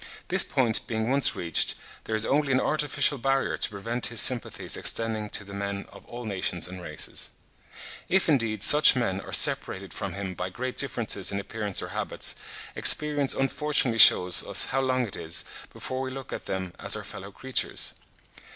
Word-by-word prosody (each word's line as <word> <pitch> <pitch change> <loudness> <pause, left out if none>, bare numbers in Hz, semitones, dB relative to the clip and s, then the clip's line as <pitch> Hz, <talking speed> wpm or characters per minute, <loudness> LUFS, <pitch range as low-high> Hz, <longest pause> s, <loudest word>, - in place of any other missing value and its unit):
This - - +5
point 120 -4 -1
being 110 +1 -3
once 140 0 +2
reached, 85 -3 -1 0.3
there 110 - -4
is 110 - +3
only 145 0 -1
an 130 - +2
artificial 150 -1 0
barrier 135 +2 -1
to - - -3
prevent 115 +4 -4
his 115 -2 0
sympathies 125 +1 +3
extending 110 -2 +1
to 100 - -2
the 100 0 -13
men 100 0 -6
of - - -17
all 120 0 -10
nations 95 -4 -2
and 90 0 -10
races. 75 -3 -3 0.8
If, 190 +1 +1
indeed, 115 - 0
such 150 +2 +8
men 100 -6 -3
are - - -12
separated - - +2
from - - -6
him 95 -1 -6
by 90 +1 -6
great 125 +7 -6
differences 115 -8 -1
in 100 - -4
appearance 105 -1 -2
or - - -8
habits, - - -2 0.4
experience 145 -2 +4
unfortunately 135 -3 -1
shews 90 -4 +7
us - - +2
how 135 - -2
long 130 -1 -1
it 100 - -9
is, 80 +1 -1 0.3
before 130 0 -7
we 130 - -5
look 135 0 -9
at - - -8
them 95 -2 -5
as - - +1
our - - -7
fellow 100 +2 -11
creatures. 130 +6 -2
115 Hz, 180 wpm, -25 LUFS, 100-135 Hz, 0.8 s, such